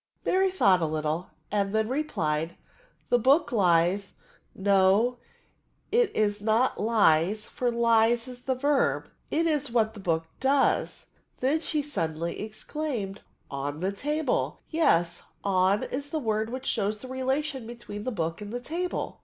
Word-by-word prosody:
Mary 380 Hz, +1 st, +3 dB
thought 195 Hz, -, +3 dB
a 160 Hz, -, +1 dB
little, 155 Hz, +2 st, -2 dB, 0.2 s
and 200 Hz, 0 st, 0 dB
then 220 Hz, 0 st, +2 dB
replied, 170 Hz, -, -1 dB, 0.5 s
The 245 Hz, -, +4 dB
book 270 Hz, +8 st, +3 dB
lies 185 Hz, -1 st, +2 dB, 0.2 s
— -, -, -36 dB
no, 200 Hz, +5 st, +3 dB, 0.7 s
it 470 Hz, -2 st, +4 dB
is 205 Hz, -1 st, +1 dB
not 225 Hz, +4 st, +2 dB
lies, 210 Hz, -2 st, +3 dB
for 245 Hz, -1 st, -2 dB
lies 230 Hz, 0 st, +3 dB
is 250 Hz, -1 st, -8 dB
the 260 Hz, 0 st, -1 dB
verb— 285 Hz, +2 st, +1 dB, 0.2 s
'it 330 Hz, +2 st, +1 dB
is 295 Hz, -4 st, +1 dB
what 225 Hz, -2 st, +1 dB
tbe 205 Hz, -, -10 dB
book 165 Hz, -3 st, 0 dB
does: 270 Hz, +1 st, +1 dB, 0.3 s
then 275 Hz, +5 st, +1 dB
she 305 Hz, -2 st, -1 dB
suddenly 170 Hz, -, -3 dB
exclaimed, 215 Hz, -1 st, -4 dB, 0.3 s
on 140 Hz, +2 st, -4 dB
the 185 Hz, +3 st, 0 dB
table 300 Hz, -, -1 dB
^yes, 175 Hz, -, +2 dB, 0.2 s
on 190 Hz, +1 st, +2 dB
is 280 Hz, +2 st, -4 dB
the 315 Hz, -, -2 dB
word 220 Hz, -5 st, -1 dB
which 255 Hz, +2 st, -6 dB
shows 215 Hz, -3 st, 0 dB
the 255 Hz, -, -10 dB
relation 265 Hz, 0 st, -2 dB
between 235 Hz, -3 st, -8 dB
the 255 Hz, -, -2 dB
book 165 Hz, -3 st, -3 dB
and 205 Hz, 0 st, -7 dB
the 245 Hz, -, -3 dB
table." 340 Hz, +8 st, -3 dB
220 Hz, 155 wpm, -27 LUFS, 190-265 Hz, 0.7 s, The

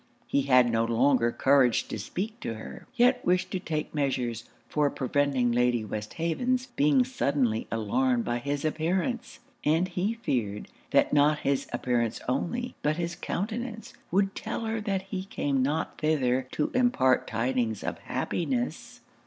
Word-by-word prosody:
He 140 Hz, -, +1 dB
had 125 Hz, -3 st, +4 dB
no 115 Hz, 0 st, +2 dB
longer 120 Hz, +1 st, +3 dB
courage 135 Hz, -3 st, +3 dB
to -, -, -4 dB
speak 205 Hz, -, -4 dB
to 115 Hz, -, -4 dB
her; 110 Hz, -, -9 dB
yet 250 Hz, +1 st, +4 dB
wished 185 Hz, +1 st, +1 dB
to 185 Hz, -, -1 dB
take 155 Hz, -4 st, -3 dB
measures 125 Hz, -5 st, -1 dB, 0.2 s
for 150 Hz, -1 st, +1 dB
preventing 135 Hz, -2 st, +1 dB
Lady 120 Hz, -1 st, +2 dB
Westhaven's 165 Hz, -, -1 dB
being 145 Hz, -, +3 dB
suddenly 130 Hz, -3 st, 0 dB
alarmed 120 Hz, +3 st, +1 dB
by 120 Hz, 0 st, -1 dB
his 145 Hz, +4 st, -2 dB
appearance; 185 Hz, -, -1 dB, 0.2 s
and 165 Hz, +5 st, +2 dB
he 190 Hz, +5 st, -1 dB
feared, 110 Hz, -, -2 dB, 0.2 s
that -, -, +3 dB
not 150 Hz, +1 st, +4 dB
his 140 Hz, -1 st, 0 dB
appearance 120 Hz, -3 st, 0 dB
only, 240 Hz, -, -1 dB
but 150 Hz, +1 st, +1 dB
his 170 Hz, -1 st, -2 dB
countenance, 225 Hz, +3 st, -4 dB, 0.2 s
would 195 Hz, +2 st, +2 dB
tell -, -, -4 dB
her 225 Hz, 0 st, -2 dB
that 195 Hz, -3 st, -1 dB
he 190 Hz, -1 st, -5 dB
came 140 Hz, -8 st, -1 dB
not 150 Hz, +5 st, -1 dB
thither 130 Hz, -5 st, +1 dB
to 150 Hz, -, 0 dB
impart 240 Hz, -, +3 dB
tidings 115 Hz, -3 st, -1 dB
of -, -, -3 dB
happiness. 245 Hz, +7 st, -3 dB
145 Hz, 150 wpm, -28 LUFS, 125-185 Hz, 0.2 s, had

